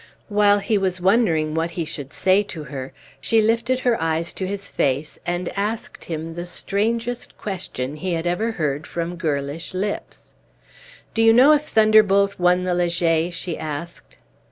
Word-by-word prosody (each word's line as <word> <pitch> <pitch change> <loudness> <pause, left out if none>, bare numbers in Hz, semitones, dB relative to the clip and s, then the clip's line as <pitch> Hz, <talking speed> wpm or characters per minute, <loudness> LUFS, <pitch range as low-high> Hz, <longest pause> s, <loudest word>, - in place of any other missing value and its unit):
While 205 -1 +4
he 205 +1 +1
was 185 -1 0
wondering 175 -6 +2
what 165 +1 0
he 170 -1 -3
should 145 -3 -7
say 190 +2 +3
to 165 -6 -7
her, 135 -3 -7 0.3
she 225 - +3
lifted 230 +4 +1
her 240 -6 +1
eyes 165 +1 0
to 190 - -3
his 200 +1 -4
face, 140 +3 -1
and 175 0 -1
asked 210 +3 -3
him 165 0 -5
the 175 +1 -6
strangest 230 +6 -2
question 155 -8 -5
he 180 +3 -2
had 165 0 -2
ever 215 +7 0
heard 150 -4 -2
from 170 +1 -4
girlish 155 +1 -3
lips. 200 +2 -4 0.8
"Do 225 - +1
you 225 0 +6
know 255 +6 +7
if 300 0 +3
Thunderbolt 210 -4 +4
won 180 +1 +3
the 180 -1 0
Leger?" 170 -1 +1
she 175 -1 -5
asked. 150 - -7
180 Hz, 165 wpm, -22 LUFS, 165-210 Hz, 0.8 s, know